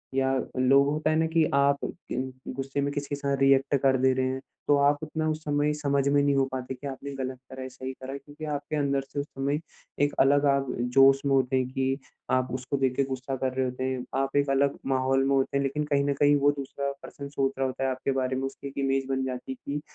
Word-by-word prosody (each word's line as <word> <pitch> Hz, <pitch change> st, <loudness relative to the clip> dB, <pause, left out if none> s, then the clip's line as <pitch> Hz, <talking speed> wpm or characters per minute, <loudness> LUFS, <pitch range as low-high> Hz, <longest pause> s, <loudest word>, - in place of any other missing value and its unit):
या 135 Hz, 0 st, +2 dB, 0.3 s
लोग 135 Hz, +2 st, +5 dB
होता 155 Hz, +1 st, 0 dB
है 155 Hz, -, +2 dB
ना 160 Hz, -, +3 dB
कि 165 Hz, 0 st, +3 dB
आप 140 Hz, 0 st, +4 dB
अम, 130 Hz, 0 st, -5 dB, 0.2 s
गुस्से 135 Hz, +1 st, -2 dB
में 140 Hz, 0 st, 0 dB
किसी 145 Hz, 0 st, -3 dB
के 145 Hz, -, -1 dB
साथ 140 Hz, -1 st, -1 dB
रिएक्ट 135 Hz, +1 st, +4 dB
कर 135 Hz, -1 st, +4 dB
दे 130 Hz, 0 st, +5 dB
रहे 130 Hz, 0 st, 0 dB
हैं, 130 Hz, 0 st, -3 dB, 0.3 s
तो 145 Hz, -, +5 dB
आप 140 Hz, +1 st, +4 dB
उतना 155 Hz, 0 st, -2 dB
उस 155 Hz, 0 st, -1 dB
समय 145 Hz, 0 st, +1 dB
समझ 140 Hz, -2 st, 0 dB
में 145 Hz, 0 st, +4 dB
नहीं 140 Hz, 0 st, +2 dB
हो 135 Hz, -, +4 dB
पाते 130 Hz, 0 st, -4 dB
कि 140 Hz, +3 st, -7 dB
आपने 140 Hz, +1 st, -6 dB
ग़लत 130 Hz, -1 st, -4 dB
करा, 130 Hz, 0 st, -6 dB
सही 130 Hz, 0 st, -7 dB
करा 130 Hz, +1 st, -8 dB
है, 140 Hz, -, -5 dB
क्योंकि 145 Hz, +2 st, -10 dB
आपके 150 Hz, 0 st, -3 dB
अंदर 140 Hz, -2 st, +1 dB
से 145 Hz, -, -2 dB
उस 140 Hz, -, -2 dB
समय, 140 Hz, +2 st, -2 dB, 0.4 s
एक 145 Hz, 0 st, +2 dB
अलग 145 Hz, +2 st, +5 dB
आप 140 Hz, -1 st, +2 dB, 0.3 s
जोश 135 Hz, 0 st, +7 dB
में 140 Hz, -, +2 dB
होते 130 Hz, 0 st, +2 dB
हैं 130 Hz, -1 st, +1 dB
कि 130 Hz, +1 st, 0 dB, 0.3 s
आप 130 Hz, 0 st, +1 dB
उसको 130 Hz, +2 st, -2 dB
देख 130 Hz, -2 st, +1 dB
के 140 Hz, -, +2 dB
गुस्सा 130 Hz, 0 st, -4 dB
कर 130 Hz, 0 st, -2 dB
रहे 130 Hz, 0 st, 0 dB
होते 125 Hz, 0 st, -3 dB
हैं। 130 Hz, -1 st, -2 dB, 0.2 s
आप 135 Hz, 0 st, -2 dB
एक 140 Hz, -1 st, +2 dB
अलग 140 Hz, +1 st, +2 dB, 0.2 s
माहौल 135 Hz, +1 st, +2 dB
में 140 Hz, -, +3 dB
होते 135 Hz, +1 st, +1 dB
हैं 140 Hz, -, +1 dB
लेकिन 140 Hz, +2 st, -1 dB
कहीं 140 Hz, 0 st, +3 dB
न 140 Hz, -, +1 dB
कहीं 145 Hz, 0 st, +6 dB
वो 145 Hz, +1 st, +5 dB
दूसरा 140 Hz, +1 st, -3 dB
पर्सन 140 Hz, -1 st, -8 dB
सोच 135 Hz, -1 st, 0 dB
रहा 135 Hz, 0 st, +1 dB
होता 130 Hz, +1 st, -4 dB
है 135 Hz, -, +2 dB
आपके 130 Hz, +1 st, -2 dB
बारे 130 Hz, 0 st, -1 dB
में 135 Hz, -, -2 dB
उसकी 135 Hz, +1 st, -8 dB
एक 140 Hz, -, -10 dB
इमेज 135 Hz, 0 st, +1 dB
बन 135 Hz, 0 st, 0 dB
जाती 130 Hz, 0 st, -5 dB
है -, -, -4 dB, 0.2 s
कि, 150 Hz, -, -2 dB
135 Hz, 260 wpm, -27 LUFS, 130-140 Hz, 0.4 s, जोश